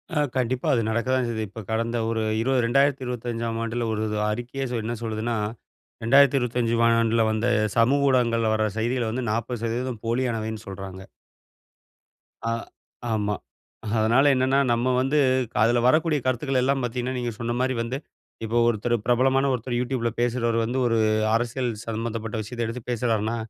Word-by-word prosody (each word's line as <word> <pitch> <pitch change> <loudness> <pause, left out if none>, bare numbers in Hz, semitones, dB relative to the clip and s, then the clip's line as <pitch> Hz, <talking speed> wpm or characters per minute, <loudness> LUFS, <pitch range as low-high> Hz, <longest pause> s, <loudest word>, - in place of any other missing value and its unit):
ஆ - - +2 0.2
கண்டிப்பா 130 +3 -1
அது 120 - +2
நடக்கதான் 125 +3 +1
செய்யுது. 110 -2 -2
இப்ப 110 +2 -8
கடந்த 115 +1 0
ஒரு 115 -1 -1 0.2
20 130 +1 +2
2025ம் 120 -3 0
ஆண்டுல 115 +1 -2
ஒரு 110 0 -2
இது 105 - -2
அறிக்கையே 120 +5 -4 0.2
என்ன 115 +2 -3
சொல்லுதுன்னா, 110 +1 -2 0.7
2025 125 -2 +3 0.2
ஆண்டுல 115 0 +2
வந்த 110 +2 0 0.3
சமூக 140 +5 +4
ஊடகங்கள்ல 115 -3 +2
வர 110 0 +1
செய்திகள் 120 0 0
வந்து 120 +1 -3
40% 115 +1 -3
போலியானவைன்னு 115 -2 -2
சொல்றாங்க. 95 -1 -7 1.5
ஆ - - +1 0.6
ஆமா. 105 -1 0 0.6
அதனால 115 +5 +4
என்னன்னா, 130 +2 +2
நம்ம 120 +2 +1
வந்து 135 +3 +1 0.4
க - - -37
அதில 120 +2 +3
வரக்கூடிய 155 +2 +3
கருத்துக்கள் 130 +1 0
எல்லாம் 135 +1 +1
பார்த்தீங்கன்னா, 125 +1 -2
நீங்க 120 -1 -2
சொன்னமாரி 120 +2 0
வந்து 115 +3 -3 0.5
இப்போ 115 +2 -1
ஒருத்தரு 120 +1 +1
பிரபலமான 130 +2 +3
ஒருத்தரு 120 0 -2
Youtubeல 125 -1 -1
பேசுறவரு 120 -1 +1
வந்து, 120 +3 -2
ஒரு 115 - +1 0.4
அரசியல் 120 +2 -1 0.2
சம்மந்தப்பட்ட 115 0 -4
விஷயத்த 115 +2 -4
எடுத்து 115 +2 -5
பேசுறார்ன்னா, 115 -2 0
120 Hz, 140 wpm, -25 LUFS, 115-130 Hz, 1.5 s, சமூக